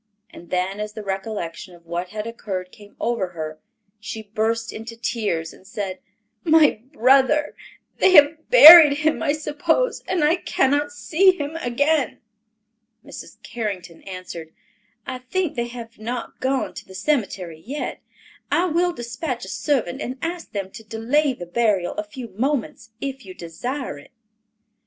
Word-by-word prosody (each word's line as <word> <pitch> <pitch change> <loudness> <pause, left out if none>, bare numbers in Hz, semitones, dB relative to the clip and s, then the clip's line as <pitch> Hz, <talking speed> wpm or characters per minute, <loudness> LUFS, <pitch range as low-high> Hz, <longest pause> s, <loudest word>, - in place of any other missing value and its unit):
And 170 - -13
then 185 +2 -1
as 210 0 -4
the 215 0 -7
recollection 190 -3 -5
of 170 -1 -20
what 175 +2 -4
had 210 +1 -5
occurred 190 -5 -5
came 205 -1 -16
over 230 -5 -1
her, 155 -2 -6 0.4
she 220 +1 -6
burst 225 +2 -2
into 230 +1 -8
tears 210 -9 -2
and 190 - -18
said, 195 -2 -5 0.4
"My 315 -9 +4
brother—they 275 +8 +2
have 310 0 +5
buried 325 -9 +11
him, 310 +1 0
I 290 -3 +1
suppose, 320 +10 0
and 360 -4 0
I 315 +4 +4
cannot 290 -3 +1
see 360 +6 +3
him 290 +2 -4
again." 285 +2 0 0.9
Mrs. - - -11
Carrington 195 -7 -5
answered, 185 -4 -8 0.5
"I 260 -1 -5
think 320 +6 -2
they 235 -1 -1
have 235 -2 -10
not 235 +2 -5
gone 265 0 -1
to - - -9
the 190 - -12
cemetery 190 - -2
yet. 280 +5 -5 0.5
I 350 - +3
will 350 +1 +1
dispatch 240 - -5
a - - -9
servant 230 - -1
and 255 +2 -4
ask 335 +2 -5
them 195 -2 -4
to 225 - -11
delay 250 +7 0
the 175 - -8
burial 195 -1 +1
a 315 - -3
few 260 -7 -9
moments, 235 +1 -2
if 270 -1 -4
you 185 -2 -11
desire 240 - -5
it." 145 - -16
235 Hz, 150 wpm, -22 LUFS, 195-290 Hz, 0.9 s, buried